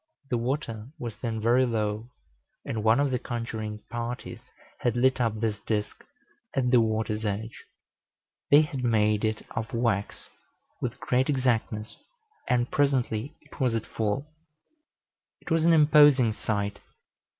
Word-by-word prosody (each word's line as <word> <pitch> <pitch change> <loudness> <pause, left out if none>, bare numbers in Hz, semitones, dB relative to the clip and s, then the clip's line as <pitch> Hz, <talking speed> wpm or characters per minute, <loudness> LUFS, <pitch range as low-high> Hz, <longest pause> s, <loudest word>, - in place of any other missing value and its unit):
The 120 - +2
water 120 -3 -3
was 115 -3 -5
then 115 -2 -3
very 120 +4 +4
low, 110 -1 -1 0.6
and 110 -2 -3
one 110 +3 +4
of 140 -1 +2
the 125 - 0
conjuring 110 -3 -5
parties 120 +1 -5 0.4
had 120 -2 0
lit 130 +1 +3
up 110 -2 0
this 110 -2 -1
disk 105 -1 -3 0.5
at 125 -2 +1
the 125 -2 +6
water's 110 -1 -1
edge. 110 +2 -4 0.8
They 145 +1 +8
had 140 -4 -3
made 105 -3 +2
it 110 -1 -1
of 110 0 -4
wax, 115 -4 -1 0.5
with - - -3
great 130 +2 +1
exactness, 115 -5 0 0.5
and 120 0 +1
presently 130 -3 0
it - - -17
was 125 -4 +2
at 115 - -2
full. 110 +6 -2 1.1
It - - -10
was 165 0 +3
an 170 - +6
imposing 145 -6 +6
sight. 100 -2 -2
115 Hz, 140 wpm, -27 LUFS, 110-130 Hz, 1.1 s, They